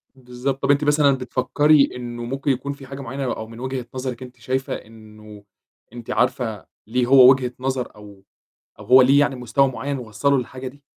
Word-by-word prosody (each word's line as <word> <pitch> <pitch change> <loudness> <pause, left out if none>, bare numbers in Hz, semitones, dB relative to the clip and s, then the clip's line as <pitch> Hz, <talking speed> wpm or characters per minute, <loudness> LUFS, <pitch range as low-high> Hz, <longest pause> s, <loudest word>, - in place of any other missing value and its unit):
بالضبط، 130 +1 -5
طَب 140 - +3
أنتِ 145 +1 +2
مثلًا 145 -1 +4
بتفكّري 140 +3 +2
إنه 120 -1 -6
ممكن 135 +3 -2
يكون 135 +2 -3
في 140 -1 -13
حاجة 140 +1 -8
معيّنة؟ 135 +1 -5
أو 110 - -7
من 115 0 -12
وجهة 130 -1 -4
نظرِك 130 -1 -5
أنتِ 125 0 -13
شايفة 130 +3 -3
إنه 105 -1 -12 0.5
أنتِ 120 -1 -8
عارفة 125 -5 -1 0.2
ليه 125 +2 0
هو 130 0 +8
وجهة 130 -2 0
نظر 130 -3 -3
أو 100 -2 -15 0.6
أو - - -11
هو 130 +1 +7
ليه 135 +3 +5
يعني 145 -2 +1
مستوى 125 +3 +1
معيّن 130 +3 -4
وصّله 125 +4 0
للحاجة 130 +1 -5
دي؟ 140 +2 -12
130 Hz, 185 wpm, -21 LUFS, 120-135 Hz, 0.6 s, هو